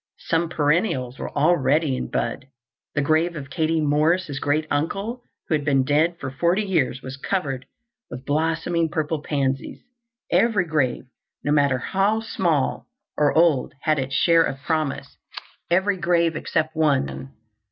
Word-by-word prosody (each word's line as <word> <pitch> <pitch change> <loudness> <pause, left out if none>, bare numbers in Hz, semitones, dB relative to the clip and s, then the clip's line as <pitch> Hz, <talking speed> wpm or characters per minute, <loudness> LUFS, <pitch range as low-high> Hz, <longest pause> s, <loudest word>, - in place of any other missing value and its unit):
Some 165 0 -1
perennials 145 - 0
were - - -4
already 150 -2 +2
in - - -4
bud. 120 +3 -3 0.5
The 145 - +1
grave 160 +3 +1
of 140 -3 -8
Katie 160 +3 0
Morris' 150 +1 +1
great 145 +3 0
uncle, 195 +11 -2 0.3
who - - -1
had 150 -2 +1
been 140 -2 +2
dead 155 +5 +2
for 130 - -5
forty 170 +9 +1
years, 170 -9 0
was 130 +1 -7
covered 135 -5 -3 0.4
with 125 +2 -8
blossoming 165 +2 0
purple 155 -1 -2
pansies. 135 -3 -2 0.5
Every 200 0 +3
grave, 150 -6 0 0.4
no 145 - 0
matter 140 -3 +3
how 195 - +1
small 175 - -1 0.3
or 150 -1 +3
old, 160 -6 +3
had 155 -2 +2
its 135 +1 -3
share 165 -1 +5
of 135 - -1
promise—every 170 +5 -2
grave 170 -2 +1
except 155 +1 -1
one. 70 - 0
155 Hz, 140 wpm, -23 LUFS, 140-170 Hz, 0.5 s, share